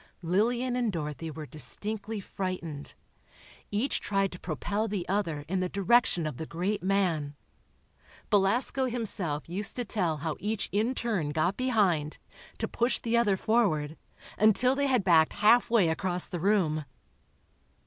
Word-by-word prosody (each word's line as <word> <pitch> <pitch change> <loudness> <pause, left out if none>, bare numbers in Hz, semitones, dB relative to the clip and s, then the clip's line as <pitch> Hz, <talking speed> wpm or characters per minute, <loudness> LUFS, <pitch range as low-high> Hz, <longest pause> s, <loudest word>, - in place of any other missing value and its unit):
Lillian 235 +8 +1
and 240 -3 0
Dorothy 160 -1 -4
were 155 0 -7
distinctly 210 +8 -5
frightened. 180 -7 -5 0.7
Each 215 +7 0
tried 195 -1 0
to 180 - -9
propel 205 +7 -2
the 200 -4 -3
other 170 -7 -1
in 190 +2 -1
the 185 0 -1
direction 200 -3 +2
of 150 -5 -4
the 160 - -6
great 185 +5 -2
man. 175 -7 0 1.0
Belasco 220 +6 +2
himself 205 - -1
used 195 +5 0
to 245 - -2
tell 175 -8 0
how 155 +1 -3
each 210 0 -2
in 220 +6 0
turn 205 -13 -1
got 160 +6 0
behind, 200 - +1 0.4
to - - -2
push 240 +2 0
the 230 0 -1
other 210 -5 +3
forward, 180 -10 +1 0.4
until 220 +4 +4
they 280 +1 0
had 250 -6 +2
backed 165 -4 +4
halfway 225 -1 +4
across 180 +2 0
the 175 - -5
room. 170 -5 +1
195 Hz, 145 wpm, -29 LUFS, 165-220 Hz, 1.0 s, until